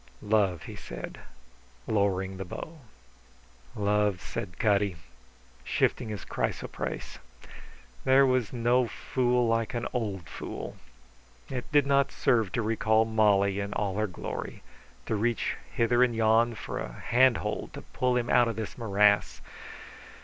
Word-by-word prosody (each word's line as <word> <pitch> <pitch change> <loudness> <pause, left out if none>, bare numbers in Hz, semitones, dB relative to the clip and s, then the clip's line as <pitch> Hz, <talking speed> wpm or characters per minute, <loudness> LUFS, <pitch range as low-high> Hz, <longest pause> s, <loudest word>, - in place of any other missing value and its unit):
] 65 - -29
"Love," 100 -5 +1
he - - -8
said, - - -8 0.7
lowering 95 -2 0
the 95 - -4
bow. 155 - -8 1.0
"Love," 105 -2 +1
said 85 - -6
Cutty, 100 -3 +2 0.7
shifting 110 - 0
his 105 -2 -6
chrysoprase. - - -4 0.8
There 135 +1 +6
was 130 -4 +1
no 120 +1 +2
fool 125 0 0
like 115 +2 0
an 120 - -2
old 100 -8 -3
fool. - - -7 0.8
It 125 +1 -5
did 145 -2 +4
not 140 0 +3
serve 110 -6 +1
to 120 - 0
recall 110 0 +2
Molly 100 -3 +3
in 100 0 -3
all 100 -2 -1
her 110 0 +1
glory, 90 - -6 0.4
to - - -2
reach 115 +2 0 0.2
hither 120 +1 +2
and 120 -2 +1
yon 115 +1 +3
for - - -5
a 60 - -5
handhold 120 - +1
to - - -8
pull 125 -1 0
him 120 -1 -1
out 120 0 +4
of 115 - -2
this 110 +2 -6
morass. 105 -2 +3
110 Hz, 140 wpm, -28 LUFS, 100-120 Hz, 1.0 s, There